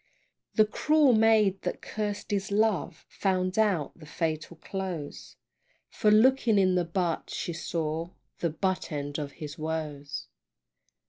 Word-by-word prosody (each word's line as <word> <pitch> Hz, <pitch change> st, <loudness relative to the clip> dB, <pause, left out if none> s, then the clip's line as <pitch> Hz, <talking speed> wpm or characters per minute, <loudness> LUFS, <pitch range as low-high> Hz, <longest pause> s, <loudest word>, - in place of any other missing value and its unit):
The 215 Hz, -, +6 dB
cruel 295 Hz, +5 st, +3 dB
maid 215 Hz, -3 st, +4 dB
that -, -, -4 dB
caused 210 Hz, 0 st, -4 dB
his 195 Hz, -1 st, -1 dB
love 215 Hz, -1 st, 0 dB
Found 185 Hz, 0 st, 0 dB
out 195 Hz, -9 st, +1 dB
the 155 Hz, -3 st, -14 dB
fatal 160 Hz, +1 st, -3 dB
close, 180 Hz, -5 st, -6 dB, 0.6 s
For 210 Hz, -, +2 dB
looking 225 Hz, 0 st, +5 dB
in 185 Hz, -2 st, +4 dB
the 180 Hz, -1 st, +2 dB
butt, 170 Hz, -1 st, -1 dB
she 170 Hz, -, -3 dB
saw 165 Hz, 0 st, -3 dB, 0.3 s
The 170 Hz, -, +1 dB
butt 185 Hz, +3 st, -2 dB
end 145 Hz, 0 st, -3 dB
of 145 Hz, -2 st, -5 dB
his 155 Hz, 0 st, -8 dB
woes. 155 Hz, -2 st, -4 dB
185 Hz, 135 wpm, -28 LUFS, 160-210 Hz, 0.6 s, The